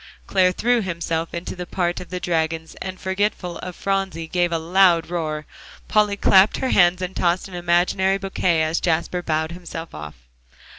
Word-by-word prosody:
'" - - -30
Clare 185 -1 +3
threw 235 +5 +1
himself 170 -3 -3
into 170 +2 -5
the 180 -1 -6
part 175 -1 -1
of 180 - -9
the 180 - -4
dragons, 160 -1 -1
and 185 -1 -5
forgetful 190 -2 -2
of 180 -1 -7
Phronsie, 195 -4 -2
gave 175 +1 0
a 165 - +1
loud 170 0 +3
roar. 155 -3 -3 0.4
Polly 210 -1 +2
clapped 195 +1 +5
her 260 - -1
hands 180 0 +4
and 185 +1 -5
tossed 175 +2 +1
an 190 - -13
imaginary 180 +2 +2
bouquet 185 -4 0
as 160 +1 0
Jasper 170 +1 0
bowed 160 -1 -1
himself 170 -1 -8
off. 75 -1 -8
175 Hz, 180 wpm, -22 LUFS, 165-190 Hz, 0.4 s, clapped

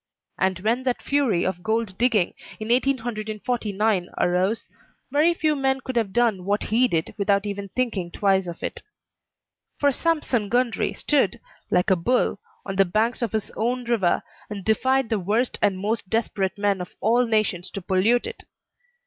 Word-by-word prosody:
And 190 -1 +1
when 230 +5 +1
that 255 -2 -1
fury 270 -11 +1
of 185 -1 -2
gold 220 -1 -1
digging 230 -7 +2 0.3
in 215 +1 -5
1849 220 -5 0
arose, 185 +5 +1 0.4
very 310 +5 +3
few 310 -2 +1
men 270 -1 +1
could 260 -1 -5
have 225 -5 +1
done 225 -4 +2
what 205 +3 0
he 250 +3 +5
did 165 -7 -1
without 200 0 +2
even 200 -1 -4
thinking 220 -9 -1
twice 190 0 +1
of 170 -1 -7
it. - - -4 1.0
For 285 -1 +3
Sampson 270 -8 0
Gundry 245 -2 +1
stood, 295 -2 +1 0.3
like 180 +1 +2
a - - +6
bull, 200 +3 +1 0.3
on 195 -1 -4
the 195 - +5
banks 220 +8 0
of 235 - -1
his 220 -1 -2
own 245 +3 -1
river, 230 -7 +1 0.3
and 200 -3 -6
defied 260 +3 +2
the 220 -3 +1
worst 215 +7 0
and 200 -2 +2
most 210 0 -2
desperate 200 -3 -1
men 200 -2 +1
of 180 - -8
all 240 +3 +3
nations 200 -5 0
to - - -5
pollute 200 +7 +2
it. - - -7
215 Hz, 165 wpm, -24 LUFS, 195-245 Hz, 1.0 s, a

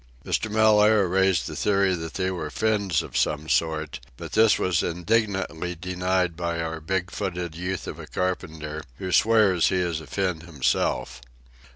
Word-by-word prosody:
Mr. 110 - -1
Mellaire 105 -1 +4
raised 95 0 +2
the - - -6
theory 100 -2 +2
that 80 -2 -5
they 95 0 0
were 85 -4 -4
Finns 100 -3 0
of - - -11
some 75 +1 0
sort, 80 -3 0 0.2
but - - -8
this 110 -1 +5
was 85 -3 +1
indignantly 90 -2 -1
denied 90 0 -1
by 85 0 -2
our 80 0 -3
big 90 +2 -2
footed 90 -2 -4
youth 90 +2 -4
of - - -7
a - - -9
carpenter, 80 -4 -3
who 95 +6 -5
swears 105 -5 +4
he - - 0
is 85 -3 -1
a 80 - -12
Finn 90 +1 -1
himself. 75 -6 -1
90 Hz, 165 wpm, -25 LUFS, 80-95 Hz, 0.2 s, this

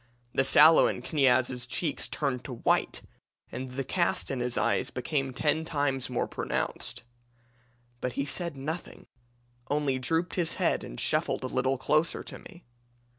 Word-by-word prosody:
The 135 - +3
sallow 155 +4 +7
in - - -3
Kniaz's 130 -4 +2
cheeks 145 +4 -1
turned 135 -4 -2
to 135 - -5
white, 115 - 0 0.5
and 130 +2 -5
the 135 +1 -2
cast 170 +2 0
in 135 - -2
his 125 0 -1
eyes - - +1
became 135 +1 -2
ten 155 +4 0
times 145 -5 -1
more 125 - -1
pronounced. - - -3 1.0
But 125 0 -3
he 140 - -1
said 145 +3 -1
nothing 155 +6 -6 0.6
only 145 -3 +1
drooped 165 +7 0
his 170 -3 0
head - - +1
and - - -7
shuffled - - +1
a - - -2
little 130 +1 0
closer 155 +5 +1
to - - -9
me. 175 -3 -15
135 Hz, 155 wpm, -28 LUFS, 130-160 Hz, 1.0 s, sallow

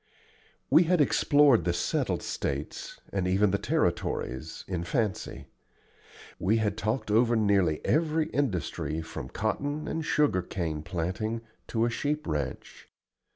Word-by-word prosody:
We 170 - +7
had 180 +1 +3
explored 145 - +5
the 85 +1 +1
settled 85 - -1
States, 70 +2 -4
and 95 -2 0
even 95 +2 +3
the 100 - +1
Territories, 65 +6 -1
in 90 -3 -2
fancy; 105 +2 -2 0.9
we 105 +5 +2
had 105 -2 0
talked 110 +2 -2
over 115 +2 +4
nearly 100 -7 +2
every 160 0 +2
industry 85 - -1
from 80 0 -7
cotton 145 +8 -2
and 160 - -2
sugarcane 90 - 0
planting 90 +7 -3 0.3
to 115 0 +1
a 120 - 0
sheep 150 +5 -2
ranch. 75 -6 -4
105 Hz, 125 wpm, -28 LUFS, 85-135 Hz, 0.9 s, We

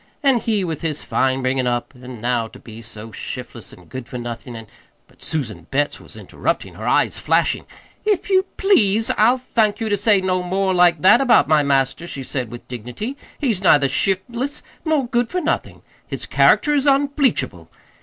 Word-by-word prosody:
"An' 270 -4 +4
he 215 -4 0
with 165 -4 -4
his 155 -3 -3
fine 130 0 0
bringin' 130 0 0
up, 120 +2 -2
an' 125 -1 -10
now 120 -1 0
to - - -14
be 110 0 -12
so 110 0 -9
shiftless - - -7
an' - - -15
good 130 -2 -8
for 130 - -6
nothin', 120 0 -7
an' 115 0 -8 0.2
" - - -40
But - - -25
Susan 110 - -3
Betts 145 +2 0
was - - -13
interrupting, - - -3
her - - -7
eyes - - +2
flashing. - - +1 0.4
"If 420 -3 0
you 380 -1 +2
please, 225 - +3
I'll 250 +2 +3
thank 225 -4 0
you 225 -2 -2
to 205 - +2
say 205 0 +4
no 185 -1 0
more 190 +1 0
like 175 -3 +4
that 235 +7 +7
about 255 -3 +4
my 155 -1 +4
master," 140 +3 0
she 135 -5 -6
said 125 -2 -3
with 120 - -10
dignity. 125 - -6 0.2
"He's 230 - -1
neither 145 -7 +5
shiftless, 235 - -1 0.2
nor 310 -5 +1
good 240 -1 0
for 365 - -1
nothin'. 325 -2 -3 0.2
His - - -5
character 295 - +4
is 285 -1 +1
unbleachable! 280 0 +1
180 Hz, 190 wpm, -20 LUFS, -, 0.4 s, that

